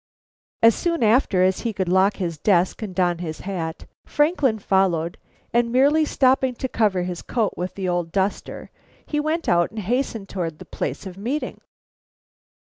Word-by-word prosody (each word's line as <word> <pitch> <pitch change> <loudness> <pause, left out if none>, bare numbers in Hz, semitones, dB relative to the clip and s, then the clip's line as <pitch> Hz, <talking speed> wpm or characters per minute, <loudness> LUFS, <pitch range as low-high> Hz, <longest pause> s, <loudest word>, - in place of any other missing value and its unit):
As 230 0 +8
soon 335 - -1
after 215 -4 +3
as 185 0 +2
he 230 -2 -2
could 190 -2 -2
lock 190 +3 +3
his 170 -5 -4
desk 180 +2 +2
and 200 -4 -5
don 175 -2 +1
his 160 -3 -5
hat, 170 -5 -5 0.2
Franklin 295 -6 +1
followed, 190 -5 +1 0.3
and 235 0 +2
merely 285 +5 +4
stopping 260 -2 +2
to 260 - -3
cover 205 -7 +1
his 180 -1 -4
coat 225 -4 -1
with 180 +1 -4
the 190 -2 -3
old 175 -2 -1
duster, 195 +2 -2 0.3
he 300 - -2
went 315 +3 -1
out 175 0 +3
and 220 - -14
hastened 225 0 -2
towards 170 -5 -4
the - - -11
place - - -4
of 190 0 -8
meeting. 260 +9 -3
195 Hz, 170 wpm, -23 LUFS, 180-250 Hz, 0.3 s, As